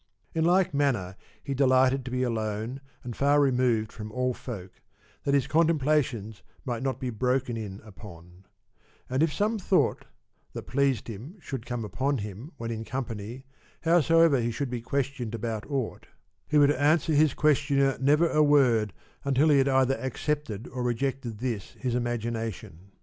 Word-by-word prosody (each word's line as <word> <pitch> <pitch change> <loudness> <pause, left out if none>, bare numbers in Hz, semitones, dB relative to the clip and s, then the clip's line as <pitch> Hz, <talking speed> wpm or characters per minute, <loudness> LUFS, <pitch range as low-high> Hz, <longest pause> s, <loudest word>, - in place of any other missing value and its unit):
In 160 0 +1
like 180 0 +3
manner 120 -11 0 0.3
he 140 - -3
delighted 130 0 +3
to - - -4
be 125 0 -1
alone 110 +2 -2 0.2
and 120 -2 -6
far 145 +1 +3
removed 125 -6 +2
from 110 -1 -8
all 125 +2 0
folk, 95 -8 -8 0.4
that 140 - +3
his 135 -3 +2
contemplations 145 -9 +1 0.2
might 120 -3 -3
not 135 0 -2
be 125 -2 -3
broken 125 +2 0
in 105 -3 -6
upon; 95 -4 -13 0.7
and 130 +2 +1
if 160 -1 +3
some 215 +6 0
thought - - +1 0.5
that - - -6
pleased 140 -2 0
him 115 - -8
well 200 - -22
should 130 -4 -6
come 120 -3 -3
upon 130 +6 -1
him 105 - -7
when 115 0 -4
in 110 -1 -4
company, 120 0 -5 0.4
howsoever 165 -3 +4
he 120 0 0
should 125 +2 -3
be 120 -2 -3
questioned 130 -2 -2
about 115 0 -4
aught 135 -5 -3 0.4
he 150 - +2
would 145 -1 +6
answer 150 +3 +2
his 150 -1 +4
questioner 140 -2 +2
never 150 +5 +4
a 155 - +3
word 125 -9 +4 0.3
until 140 +3 +3
he 145 -2 +5
had 135 +1 +3
either 130 0 +3
accepted 130 -4 -3
or 130 - -5
rejected 125 -1 -2
this 115 -4 -4
his 125 -2 -2
imagination. 115 -6 -3
130 Hz, 165 wpm, -27 LUFS, 115-140 Hz, 0.7 s, would